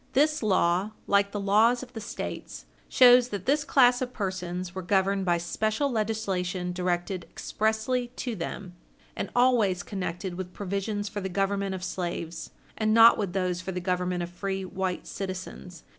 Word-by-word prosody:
This 300 +3 +3
law, 190 -1 +2
like 200 0 +2
the 205 - -3
laws 220 +5 +3
of 250 0 -12
the 225 - -6
States, 210 - -6 0.2
shows 245 -1 +7
that 200 -4 -5
this 290 +2 +2
class 245 -2 +4
of 250 0 -3
persons 180 -2 -4
were 190 - -4
governed 195 +1 +1
by 175 -1 +2
special 215 +10 -1
legislation 195 -5 -1
directed 180 0 -2
expressly 220 +3 -1
to 245 -3 -3
them, 180 +1 -6 0.4
and - - -3
always 235 -7 +3
connected 185 -2 -4
with 180 0 -6
provisions 205 +1 -3
for 205 0 -5
the 190 - -3
government 195 +1 -1
of 185 - -7
slaves, 170 -2 -4 0.3
and 215 0 +1
not 230 0 +8
with 195 -4 -2
those 180 -2 -1
for 185 +1 -5
the 180 - -3
government 180 -1 -1
of 175 - -6
free 195 +1 -3
white 185 -1 -3
citizens. 185 -3 -7
195 Hz, 165 wpm, -27 LUFS, 180-220 Hz, 0.4 s, not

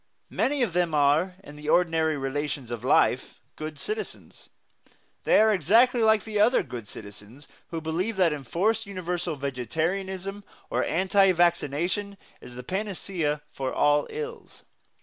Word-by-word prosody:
Many 280 -1 +1
of 210 -8 -1
them 175 -3 +1
are, 150 +6 +3
in 145 -4 -12
the 150 0 -6
ordinary 160 -3 +2
relations 135 -2 -3
of 120 -2 -5
life, - - +2 0.2
good 155 -1 -7
citizens. 430 0 -6 0.8
They - - +5
are 220 0 +5
exactly 230 - +4
like 220 -2 +4
the 215 -2 -3
other 230 +5 +4
good 115 -4 -8
citizens 105 +7 -12 0.2
who 165 -1 -5
believe 180 +7 -2
that 175 -4 +3
enforced 190 - -1
universal 180 -3 -3
vegetarianism 175 - -3 0.3
or - - +1
anti 190 +3 +3
vaccination 175 +4 0 0.2
is 120 - -11
the 125 - -7
panacea 180 -4 -2
for 130 -1 -3
all 145 0 +2
ills. 460 +1 -7
170 Hz, 140 wpm, -26 LUFS, 145-200 Hz, 0.8 s, They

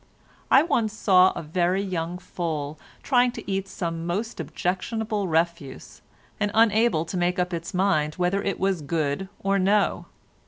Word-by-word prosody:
I 270 - +6
once 230 -10 0
saw 185 -4 +5
a - - -6
very 175 +4 0
young 175 -2 -3
foal 160 -5 -4 0.2
trying 250 -2 +3
to - - -9
eat 195 0 -2
some 165 -3 -4
most 210 +7 -3
objectionable 210 +3 -2
refuse, 165 -4 -2 0.4
and 205 -1 +1
unable 220 -6 +3
to 175 +3 -4
make 180 +1 +1
up 180 0 -1
its 170 0 -4
mind 155 -5 +1
whether 180 +2 0
it 195 -1 -2
was 190 -3 0
good 155 +4 -2
or 195 0 +2
no. 200 +2 +1
185 Hz, 155 wpm, -25 LUFS, 165-200 Hz, 0.4 s, I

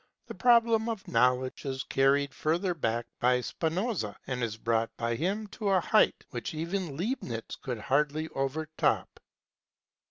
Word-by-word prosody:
The - - -7
problem 230 -2 +4
of 220 -4 -4
Knowledge 125 +2 +2
is 130 -1 -2
carried 140 0 +2
further 175 +4 0
back 120 -6 -1
by 125 0 +3
Spinoza 165 - -2
and 125 -1 -3
is 110 -2 -2
brought 115 0 +1
by 115 0 -1
him 195 - -1
to 205 0 -3
a 190 -1 +4
height 215 +5 +3
which 120 +5 -4
even 170 -2 -3
Leibniz 165 - -3
could 125 -3 -3
hardly 150 +6 +1
overtop. 155 +4 -1
145 Hz, 145 wpm, -29 LUFS, 125-190 Hz, -, problem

